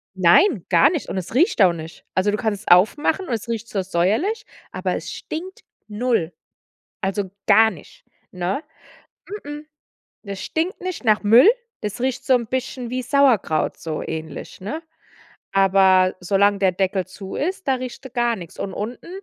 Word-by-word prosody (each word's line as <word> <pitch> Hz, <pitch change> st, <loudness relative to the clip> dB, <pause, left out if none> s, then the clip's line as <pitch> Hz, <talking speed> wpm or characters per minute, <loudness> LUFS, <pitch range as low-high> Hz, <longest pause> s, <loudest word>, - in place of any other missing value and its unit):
Nein, 185 Hz, -, +4 dB
gar 280 Hz, -, +6 dB
nicht. 325 Hz, -5 st, -3 dB
Und -, -, -3 dB
es 185 Hz, +3 st, -5 dB
riecht 285 Hz, -, +3 dB
auch 180 Hz, -2 st, +6 dB
nicht. 160 Hz, -1 st, -10 dB
Also, 195 Hz, +2 st, +2 dB
du 210 Hz, -, -1 dB
kannst 215 Hz, -4 st, -2 dB
es -, -, -18 dB
aufmachen 295 Hz, -, +3 dB
und -, -, -2 dB
es 225 Hz, -, -4 dB
riecht 230 Hz, 0 st, -4 dB
so 195 Hz, -, -1 dB
säuerlich, 215 Hz, -, 0 dB, 0.3 s
aber -, -, -2 dB
es -, -, -6 dB
stinkt 365 Hz, +4 st, -7 dB, 0.2 s
null. 210 Hz, -6 st, -1 dB, 0.7 s
Also, 190 Hz, -1 st, -2 dB, 0.2 s
gar 220 Hz, 0 st, +6 dB
nicht, -, -, -15 dB, 0.3 s
ne? 180 Hz, -, -2 dB, 0.8 s
M-m. 295 Hz, +1 st, -7 dB, 0.6 s
Das 200 Hz, -2 st, -6 dB
stinkt 335 Hz, +4 st, -2 dB
nicht 370 Hz, -6 st, -5 dB
nach 215 Hz, -2 st, +3 dB
Müll. 235 Hz, -, +7 dB, 0.3 s
Das 210 Hz, +2 st, -4 dB
riecht 255 Hz, 0 st, -2 dB
so 260 Hz, -, +5 dB
'n 240 Hz, -1 st, 0 dB
bisschen 250 Hz, 0 st, -4 dB
wie 255 Hz, 0 st, -1 dB
Sauerkraut, 250 Hz, -, +2 dB
so 160 Hz, -2 st, -4 dB
ähnlich, 160 Hz, +1 st, -7 dB
ne? 310 Hz, -, -5 dB, 0.7 s
Aber 190 Hz, -1 st, +4 dB
solange 200 Hz, +2 st, +2 dB
der 190 Hz, -2 st, +3 dB
Deckel 190 Hz, 0 st, -1 dB
zu 190 Hz, +1 st, -9 dB
ist, 370 Hz, +1 st, -3 dB
da 265 Hz, -, +3 dB
riecht 255 Hz, +1 st, -7 dB
er 260 Hz, -, -8 dB
gar 240 Hz, -2 st, +1 dB
nichts. 175 Hz, -5 st, -11 dB
Und 195 Hz, -, -4 dB
unten, 225 Hz, +4 st, -6 dB
215 Hz, 170 wpm, -22 LUFS, 190-265 Hz, 0.8 s, Müll